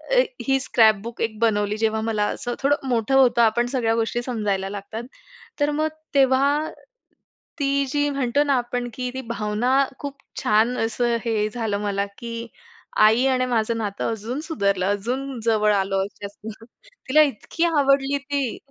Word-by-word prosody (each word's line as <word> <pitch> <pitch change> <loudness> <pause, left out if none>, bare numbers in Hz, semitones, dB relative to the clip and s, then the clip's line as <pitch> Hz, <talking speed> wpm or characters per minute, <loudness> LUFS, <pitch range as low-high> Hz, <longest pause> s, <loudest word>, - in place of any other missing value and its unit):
अ, - - +6 0.3
ही 270 0 +3
scrapbook 225 -2 +2
एक 220 -1 -1
बनवली, 210 -2 +1
जेव्हा 220 0 +1
मला 220 -2 0
असं 240 0 -4
थोडं 280 -1 +1
मोठं 240 +2 +1
होतं, 250 -3 +5
आपण 235 +1 +3
सगळ्या 230 -3 +1
गोष्टी 230 +1 -1
समजायला 205 -6 -1
लागतात. 205 +3 -6 0.6
तर 290 0 +2
मग 310 +1 0 0.3
तेव्हा, 280 +3 +3 0.9
ती 280 0 +1
जी 290 +1 +1
म्हणतो 275 0 +1
ना 285 -1 +1
आपण 245 0 -3
की 250 +1 -3
ती 260 - -4
भावना 235 +5 +1
खूप 280 -1 -6 0.3
छान 225 +4 +3
असं 235 +1 0
हे 215 -2 +1
झालं 225 -4 -1
मला 200 -1 -1
की 230 0 -6 0.5
आई 220 +4 +5
आणि 255 -1 +2
माझं 230 -2 0
नातं 205 -3 -2
अजून 225 +5 -4
सुधारलं, 200 - 0
अजून 245 +7 -2
जवळ 215 -2 +3
आलो 195 -1 +1
जास्त. 205 +1 -10 0.6
तिला 305 +4 +6
इतकी 295 +3 -1
आवडली 280 -3 +2
ती. 280 -3 -3
235 Hz, 155 wpm, -23 LUFS, 215-270 Hz, 0.9 s, अ